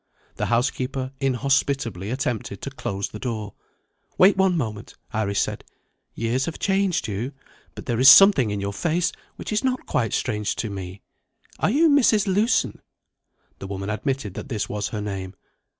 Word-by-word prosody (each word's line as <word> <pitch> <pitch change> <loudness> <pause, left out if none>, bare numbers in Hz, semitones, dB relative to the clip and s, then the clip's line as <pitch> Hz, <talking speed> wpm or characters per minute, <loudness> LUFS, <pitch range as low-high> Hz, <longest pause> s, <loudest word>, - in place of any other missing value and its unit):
The - - -1
housekeeper 130 +2 -1
inhospitably 135 -6 0
attempted 120 -6 -3
to 140 - -4
close 100 -6 -4
the 105 - -9
door. 110 -5 -4 0.6
"Wait 190 +2 +6
one 190 -2 +2
moment," 110 -7 -4 0.2
Iris 105 -2 0
said. - - -2 0.5
"Years 120 +4 0
have 165 - -5
changed 195 -5 0
you; 110 +7 -4 0.4
but - - -9
there 120 -2 -1
is 130 +1 +9
something 170 - +8
in 105 0 -2
your 100 0 -3
face 170 - 0 0.2
which - - -5
is 215 - 0
not 255 -1 -1
quite 115 -4 -1
strange 105 -4 -1
to 110 - -3
me. 95 -1 -7 0.6
Are - - +2
you 300 +9 +4
Mrs. 245 -8 +4
Lewson?" 205 +5 +1 0.8
The 95 - -7
woman 100 +1 -4
admitted 120 -1 -2
that 135 - -7
this 110 -5 -2
was 105 -1 -3
her 105 - -4
name. 95 -2 -5
125 Hz, 165 wpm, -23 LUFS, 105-165 Hz, 0.8 s, is